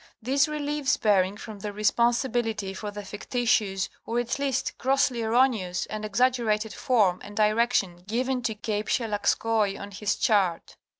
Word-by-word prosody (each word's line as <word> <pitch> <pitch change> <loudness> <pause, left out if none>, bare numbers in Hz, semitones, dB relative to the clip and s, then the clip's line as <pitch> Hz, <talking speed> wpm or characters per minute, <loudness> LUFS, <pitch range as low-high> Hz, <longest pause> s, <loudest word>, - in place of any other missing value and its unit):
This 275 +6 +2
relieves 295 -1 -1
Bering 200 -2 +2
from 215 -1 -9
the 205 +1 -4
responsibility 225 -1 0
for 210 +2 -5
the 205 0 -8
fictitious 205 -2 0 0.2
or 230 - -3
at 240 +3 -2
least 275 -2 -1
grossly 260 -2 +1
erroneous 225 -6 +1
and 215 0 -4
exaggerated 220 -1 +1
form 205 -8 +2
and 205 0 -10
direction 215 -4 +2
given 250 +4 -1
to 230 -2 -2
Cape 210 0 -3
Shelagskoi 215 -2 0
on 200 0 -8
his 205 +1 -1
chart. 190 -6 +1
220 Hz, 140 wpm, -26 LUFS, 205-245 Hz, 0.2 s, This